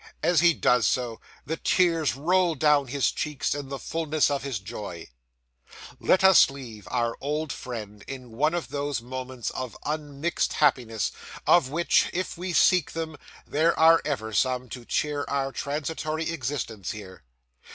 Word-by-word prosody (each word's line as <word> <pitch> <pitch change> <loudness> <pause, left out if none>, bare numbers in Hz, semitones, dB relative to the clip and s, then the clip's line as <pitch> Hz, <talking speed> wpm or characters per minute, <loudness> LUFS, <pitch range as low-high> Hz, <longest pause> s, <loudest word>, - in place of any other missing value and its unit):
As 175 -3 +4
he 170 0 +5
does 125 -2 +3
so, 120 -3 -1 0.2
the 160 +2 -3
tears 165 -6 +2
roll 175 +4 +2
down 145 -1 +3
his 135 +2 +1
cheeks, 150 -3 -2
in 145 -2 -6
the 140 - -4
fullness 155 0 0
of 140 - -1
his 135 -4 -3
joy. 95 -3 -7 0.9
Let 185 - +3
us 190 -6 +8
leave 115 -8 -10
our 120 -2 0
old 150 +1 -2
friend 105 -4 -7
in 130 -3 -8
one 150 +9 +1
of 175 - -3
those 145 -1 -2
moments 130 0 -5
of 130 -3 -5
unmixed 150 +1 -2
happiness, 120 -7 +1 0.3
of 170 -7 +5
which, 170 +4 +2
if 185 +1 -2
we 180 +1 -4
seek 180 +2 +4
them, 160 -1 -4 0.3
there 160 +3 +2
are 165 +1 +7
ever 110 -7 -3
some, 125 +1 +1
to 120 0 -8
cheer 145 +2 -1
our 135 -1 -1
transitory 155 +3 -3
existence 120 - -4
here. 95 -6 -8
140 Hz, 155 wpm, -26 LUFS, 125-160 Hz, 0.9 s, us